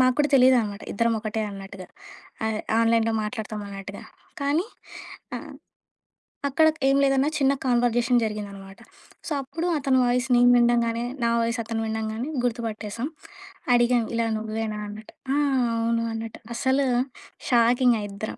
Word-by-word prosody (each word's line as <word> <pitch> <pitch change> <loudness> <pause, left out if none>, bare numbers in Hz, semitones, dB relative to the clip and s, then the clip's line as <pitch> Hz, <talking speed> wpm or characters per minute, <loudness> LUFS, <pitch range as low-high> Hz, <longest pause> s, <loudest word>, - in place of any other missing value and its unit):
మాకూడా 255 +3 +3
తెలీదనమాట, 245 -6 +4
ఇద్దరం 230 +3 +1
ఒకటే 215 0 -3
అన్నట్టుగా. 195 -1 -9 0.6
ఆహ్, 220 -1 -1 0.2
ఆన్‌లైన్‌లో 230 0 +3
మాట్లాడతామన్నట్టుగా. 205 -3 -6 0.4
కానీ 295 +7 +1 0.7
ఆ! - - -4 1.1
అక్కడ 315 +4 +3 0.2
ఏం 275 - +4
లేదన్నా 270 0 +3
చిన్న 275 -1 +3
కన్వర్జేషన్ 240 0 +2
జరిగిందనమాట. 200 -3 -6 0.5
సో - - -6
అప్పుడు 315 +6 -4
అతని 270 -2 +2
వాయిస్ 245 +1 +1
నేను 245 0 +6
వినడంగాని, 235 -1 +2 0.2
నా 235 - +3
వాయిస్ 230 +1 -1
అతను 225 0 -3
వినడంగాని 220 +4 -3
గుర్తుపట్టేసాం. 230 0 -3 0.7
అడిగాం 240 0 +4
"ఇలా 230 0 +1
నువ్వేనా?" 215 0 -3
అన్నట్టు. 210 +1 -10 0.2
"ఆ! - - +2 0.4
అవును." 230 0 0
అన్నట్టు. 225 0 -6 0.2
అసలు 265 +3 +1 0.6
షాకింగా 240 -1 +4
ఇద్దరం. 200 +2 -6
230 Hz, 120 wpm, -25 LUFS, 215-250 Hz, 1.1 s, నేను